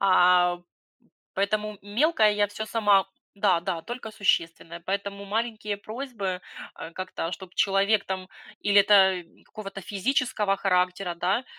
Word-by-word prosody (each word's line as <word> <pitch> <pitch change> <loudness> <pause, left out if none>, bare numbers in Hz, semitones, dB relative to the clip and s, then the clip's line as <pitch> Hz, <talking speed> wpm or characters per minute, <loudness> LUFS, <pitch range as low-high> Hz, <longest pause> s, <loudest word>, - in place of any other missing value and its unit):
А, 180 -2 +5 0.8
поэтому 210 +1 -1
мелкое 220 +3 +3
я 205 0 +2
всё 220 +2 -6
сама 205 -3 +3 0.3
да-да, 180 -4 +1
только 240 -1 -7
существенное, 170 -5 -1
поэтому 200 +2 -4
маленькие 215 -1 -2
просьбы, 215 -4 -5 0.4
э, - - -7
как-то 185 -2 -4
чтоб 185 0 -9
человек 200 +1 +2
там 185 -1 -4 0.3
или 205 0 +5
это 190 -2 +5 0.2
какого-то 195 -2 -8
физического 210 +1 0
характера, 180 -1 0
да, 185 +8 0
200 Hz, 120 wpm, -26 LUFS, 185-215 Hz, 0.8 s, А